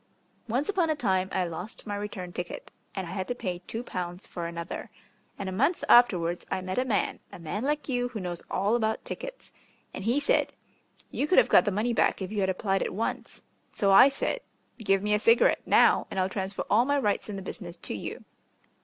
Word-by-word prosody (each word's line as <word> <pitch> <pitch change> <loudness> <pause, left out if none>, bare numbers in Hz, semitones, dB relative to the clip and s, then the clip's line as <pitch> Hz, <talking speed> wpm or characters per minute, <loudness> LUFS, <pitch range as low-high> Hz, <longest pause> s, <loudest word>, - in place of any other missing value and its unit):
Once 250 +6 0
upon 370 -5 +1
a 310 - +2
time 190 -8 0
I 185 - 0
lost 175 +5 -7
my 205 -2 -3
return 200 -3 -6
ticket, 175 -1 -6 0.2
and 190 -2 -3
I 170 - -7
had 185 -1 -3
to 245 - -2
pay 185 -7 -4
two 230 +2 -4
pounds 180 -4 -5
for 170 -1 -5
another. 170 0 -6 0.5
And 200 - -5
a - - -2
month 275 - +1
afterwards 175 -8 +5
I - - -1
met 185 +4 -2
a 255 - +1
man 220 -6 0
a - - -9
man 175 +6 -4
like 295 -1 -1
you 245 -2 0
who 240 -3 -6
knows 175 -2 -5
all 205 +4 +1
about 220 -2 -1
tickets - - -7 0.4
and 190 - -6
he 235 +7 +2
said, - - +1 0.6
'You 290 - -1
could 370 - +3
have - - +6
got - - +6
the 205 - +1
money 215 +5 0
back - - +2
if 190 0 -5
you 210 - -2
had 190 -1 +1
applied 195 +1 0
at - - -2
once.' 225 - -4 0.3
So 200 -1 +1
I 225 +8 +9
said, 275 - -2 0.4
'Give 195 -3 +1
me 210 0 +1
a 210 - +3
cigarette 230 +2 +4
now, - - +5
and 190 - -3
I'll 185 0 +1
transfer 190 +1 -3
all 225 +3 +4
my 285 +2 +1
rights 210 -5 0
in 205 - -4
the 195 - -6
business 175 -3 -6
to - - -7
you.' 105 - -6
205 Hz, 225 wpm, -28 LUFS, 185-245 Hz, 0.6 s, I